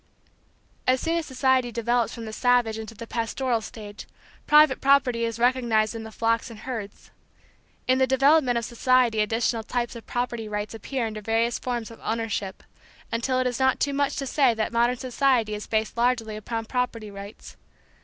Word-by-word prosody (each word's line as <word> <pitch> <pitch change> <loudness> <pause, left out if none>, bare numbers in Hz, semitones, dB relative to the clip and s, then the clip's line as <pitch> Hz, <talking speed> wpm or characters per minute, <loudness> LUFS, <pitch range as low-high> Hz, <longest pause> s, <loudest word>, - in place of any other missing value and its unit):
As 255 0 +4
soon 330 +4 0
as 325 - -6
society 260 -2 +1
develops 235 0 0
from 230 - -7
the 220 - -7
savage 245 -2 +2
into 220 0 -8
the 230 - -8
pastoral 230 +1 -1
stage, 210 -2 -9 0.4
private 300 -3 +6
property 265 -4 +3
is 230 -1 -3
recognized 235 -3 +2
in 225 - -6
the 220 0 -9
flocks 230 +2 0
and 220 -2 -11
herds. 225 -6 -7 0.8
In 255 +1 +3
the 260 - +3
development 265 -1 +4
of 235 - -2
society 245 -1 +2
additional 225 +2 +1
types 240 +2 -3
of 230 - -10
property 240 -3 -3
rights 210 +1 -3
appear 235 +3 -3
under 215 -1 -5
various 225 +2 0
forms 240 -3 -3
of 230 - -13
ownership, 220 -4 -3 0.5
until 235 +3 0
it 255 - 0
is 245 0 -1
not 265 -1 +2
too 285 - 0
much 280 0 0
to 275 - -3
say 260 -3 +3
that 220 +1 -2
modern 240 +2 +2
society 255 -3 +1
is 210 0 -6
based 220 0 -1
largely 235 -2 0
upon 225 +1 -4
property 230 -3 -2
rights. 200 +2 -10
235 Hz, 180 wpm, -25 LUFS, 220-255 Hz, 0.8 s, private